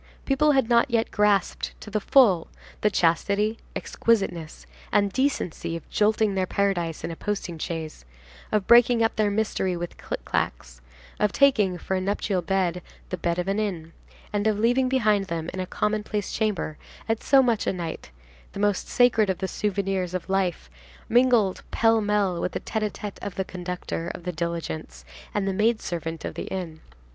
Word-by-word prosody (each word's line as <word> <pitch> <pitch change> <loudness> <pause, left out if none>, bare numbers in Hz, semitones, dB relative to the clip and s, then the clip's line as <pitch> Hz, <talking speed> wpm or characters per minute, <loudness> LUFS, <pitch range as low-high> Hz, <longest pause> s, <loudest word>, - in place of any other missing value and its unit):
People 295 +2 +3
had 270 -4 +3
not 235 +3 +4
yet 230 -1 +1
grasped 205 -3 +1
to 210 - -10
the 215 - +1
full 205 -7 +4 0.3
the 210 - +4
chastity, 200 +5 +1 0.2
exquisiteness, 175 - -1 0.3
and 200 -1 +2
decency 260 - -1
of 165 - -8
jolting 215 0 +2
their 190 -1 0
paradise 175 -5 -1
in 170 - -3
a - - -5
posting 180 -4 -4
chaise, 160 - -5 0.5
of 210 -3 +1
breaking 235 0 +6
up 225 - +1
their 215 -1 +2
mystery 200 -3 0
with 175 0 -6
clic - - -5
clacs, - - -3 0.4
of 210 - +2
taking 215 -10 +3
for 190 - -4
a 185 - 0
nuptial 195 -1 -1
bed 180 -2 0 0.3
the 185 - -3
bed 170 0 -1
of 180 +1 -2
an 200 +2 0
inn, 170 -6 -3 0.4
and 205 +1 +1
of 215 -2 +2
leaving 245 +4 +2
behind 215 -6 +2
them, 170 -2 -4
in 190 - -5
a 185 - -2
commonplace 210 0 -2
chamber, 210 -8 -1 0.3
at 225 0 0
so 270 -1 +5
much 235 -4 +1
a - - +3
night, 170 - -5 0.4
the - - -6
most 205 -1 +1
sacred 225 -4 +4
of 190 - 0
the 190 - -2
souvenirs 195 -3 -1
of 185 - -4
life 185 - 0 0.4
mingled 240 -5 +3
pell 225 -1 +3
mell 205 -4 +1
with 180 - -2
the - - -2
tête 220 - -3
à 210 -1 0
tête 205 0 -7
of 200 - -5
the 190 - -2
conductor 180 -2 -4
of 175 - -10
the 180 - -2
diligence 155 - -4 0.3
and 195 -1 0
the 195 - 0
maid 215 +3 +2
servant 165 -1 -4
of - - -4
the - - -5
inn. 170 -4 -5
195 Hz, 185 wpm, -25 LUFS, 175-215 Hz, 0.5 s, breaking